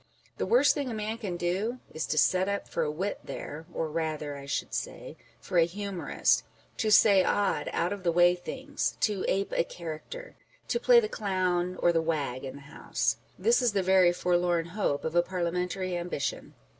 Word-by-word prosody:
The -, -, -2 dB
worse 245 Hz, +7 st, +5 dB
thing 280 Hz, -3 st, -3 dB
a 230 Hz, -, -4 dB
man 215 Hz, +1 st, -3 dB
can 190 Hz, -6 st, -4 dB
do 190 Hz, +8 st, -1 dB, 0.2 s
is 155 Hz, -, -3 dB
to 155 Hz, -, -2 dB
set 185 Hz, +5 st, +3 dB
up 200 Hz, 0 st, -2 dB
for 170 Hz, -, -2 dB
a 155 Hz, -, 0 dB
wit 185 Hz, +7 st, -3 dB
there 160 Hz, +2 st, -7 dB
â€" -, -, -19 dB
or 160 Hz, -, -1 dB
rather 155 Hz, -2 st, -3 dB
(I 140 Hz, 0 st, -9 dB
should -, -, -3 dB
say) -, -, -5 dB, 0.2 s
for 180 Hz, -, 0 dB
a 165 Hz, -, +6 dB
humorist 195 Hz, +1 st, 0 dB, 0.3 s
â€" -, -, -33 dB
to 220 Hz, -3 st, 0 dB
say 200 Hz, -2 st, +6 dB
odd 205 Hz, +1 st, 0 dB
out 175 Hz, +4 st, 0 dB
of 200 Hz, -, -7 dB
the 175 Hz, -2 st, +1 dB
way 175 Hz, +1 st, +5 dB
things, 175 Hz, 0 st, -4 dB
to 205 Hz, -3 st, +1 dB
ape 195 Hz, +1 st, 0 dB
a -, -, +3 dB
character, 170 Hz, -, -8 dB, 0.3 s
to 475 Hz, -, +1 dB
play -, -, +6 dB
the 445 Hz, -, -1 dB
clown 185 Hz, -, -1 dB
or 175 Hz, -, +6 dB
the 165 Hz, -, +2 dB
wag 145 Hz, -6 st, -2 dB
in 135 Hz, 0 st, -6 dB
the 140 Hz, -, -11 dB
House. 145 Hz, +3 st, -2 dB, 0.2 s
This 465 Hz, -, +3 dB
is 240 Hz, -4 st, +2 dB
the 195 Hz, -2 st, +1 dB
very 185 Hz, -1 st, +5 dB
forlorn 175 Hz, -1 st, +1 dB
hope 175 Hz, -9 st, -1 dB
of 160 Hz, -, -2 dB
a 175 Hz, -, +5 dB
parliamentary 180 Hz, +1 st, -2 dB
ambition. 175 Hz, -4 st, -4 dB
180 Hz, 205 wpm, -28 LUFS, 165-205 Hz, 0.3 s, a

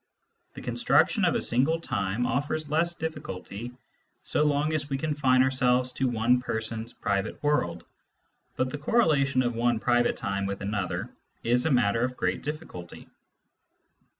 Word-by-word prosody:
The -, -, -9 dB
con -, -, -4 dB
struction -, -, +3 dB
of -, -, +2 dB
a -, -, +1 dB
single 135 Hz, +7 st, +2 dB
time 100 Hz, -5 st, -1 dB
offers 145 Hz, +5 st, -1 dB
less 170 Hz, +2 st, +2 dB
difficulty 120 Hz, -, -6 dB, 0.5 s
so -, -, +1 dB
long 150 Hz, +1 st, +1 dB
as 150 Hz, -2 st, -2 dB
we 135 Hz, -, -1 dB
confine 135 Hz, -3 st, +2 dB
ourselves 130 Hz, -1 st, +2 dB
to 130 Hz, +1 st, -1 dB
one 120 Hz, +1 st, +2 dB
person's 110 Hz, -1 st, -3 dB
private 100 Hz, +5 st, -2 dB
world, 115 Hz, -, 0 dB, 0.7 s
but 130 Hz, 0 st, -1 dB
the 145 Hz, -, -5 dB
correlation 145 Hz, -, +2 dB
of 120 Hz, 0 st, 0 dB
one 120 Hz, 0 st, +1 dB
private 120 Hz, 0 st, +2 dB
time 100 Hz, -1 st, -2 dB
with 100 Hz, 0 st, -4 dB
another 100 Hz, -2 st, -3 dB, 0.3 s
is 120 Hz, +4 st, +2 dB
a -, -, +1 dB
matter 115 Hz, -3 st, +2 dB
of 125 Hz, 0 st, -2 dB
great -, -, -1 dB
difficulty. 150 Hz, -, -7 dB
125 Hz, 150 wpm, -27 LUFS, 110-145 Hz, 0.7 s, struction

